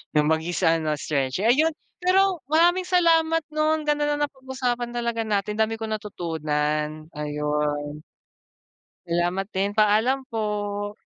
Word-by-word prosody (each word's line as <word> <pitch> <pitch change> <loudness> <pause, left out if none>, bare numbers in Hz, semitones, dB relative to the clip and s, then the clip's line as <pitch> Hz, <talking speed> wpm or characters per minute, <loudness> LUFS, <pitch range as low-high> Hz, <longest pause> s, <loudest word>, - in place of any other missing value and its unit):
'Yung 150 0 +4
mag-isa 165 0 +1
ano, 155 -1 -1
stretch, 140 +3 -2
ayun. 300 +8 +4 0.3
Pero 370 0 +3
maraming 345 +4 +3
salamat 330 -2 +3
'no, 310 0 +2
ang 315 - -2
ganda 295 0 +1
ng 295 0 -1
napag-usapan 260 -3 -3
talaga 235 -1 -2
natin, 210 0 -1
dami 220 0 +1
kong 220 -1 -3
natutunan. 155 -5 -2
Ayun. 150 0 -2 1.1
Salamat 175 +3 0
din, 195 +1 +1
paalam 220 +6 +2
po. 205 -2 -2
215 Hz, 125 wpm, -24 LUFS, -, 1.1 s, Yung